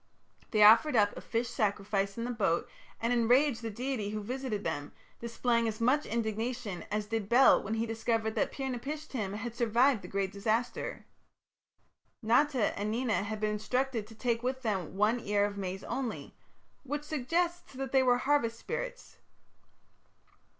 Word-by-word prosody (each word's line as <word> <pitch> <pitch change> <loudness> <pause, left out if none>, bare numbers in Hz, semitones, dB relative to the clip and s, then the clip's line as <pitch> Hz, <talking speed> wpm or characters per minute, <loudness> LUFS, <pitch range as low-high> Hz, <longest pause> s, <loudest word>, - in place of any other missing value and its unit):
They 215 -2 +4
offered 230 +7 +7
up 205 -2 +3
a - - -7
fish 230 +1 -2
sacrifice 200 -3 -1
in 230 - -2
the 245 - -2
boat 195 -8 0 0.3
and 230 +2 +1
enraged 245 +2 +3
the 230 - -3
deity 230 -1 -3
who 210 0 -4
visited 245 -2 -3
them, 145 -3 -3 0.3
displaying 235 0 0
as 215 -1 -3
much 255 +6 +2
indignation 225 -2 -3
as 210 0 -1
did 210 -2 -3
Bel 255 +3 +6
when 220 +2 -3
he 225 +1 0
discovered 225 -1 -1
that - - 0
Pir 270 - -5
napishtim 260 -5 -4
had 225 +2 -5
survived 235 +1 +3
the - - -9
great 195 -1 -1
disaster. 225 +4 -2 1.2
Nata 245 +1 +2
and 205 +1 -1
Nena 225 -1 0
had 210 +1 -4
been 215 0 0
instructed 235 +1 -1
to 225 - -13
take 230 0 -1
with 260 +1 -2
them 190 -6 -2
one 215 +4 +3
ear 205 -2 +1
of 205 0 -4
maize 190 -1 -4
only, 255 -4 -4 0.5
which 290 +2 -4
suggests 335 +5 -1
that 270 0 -5
they 265 - +5
were 250 -1 +4
harvest 255 -4 +1
spirits. - - -6
230 Hz, 165 wpm, -31 LUFS, 210-255 Hz, 1.2 s, offered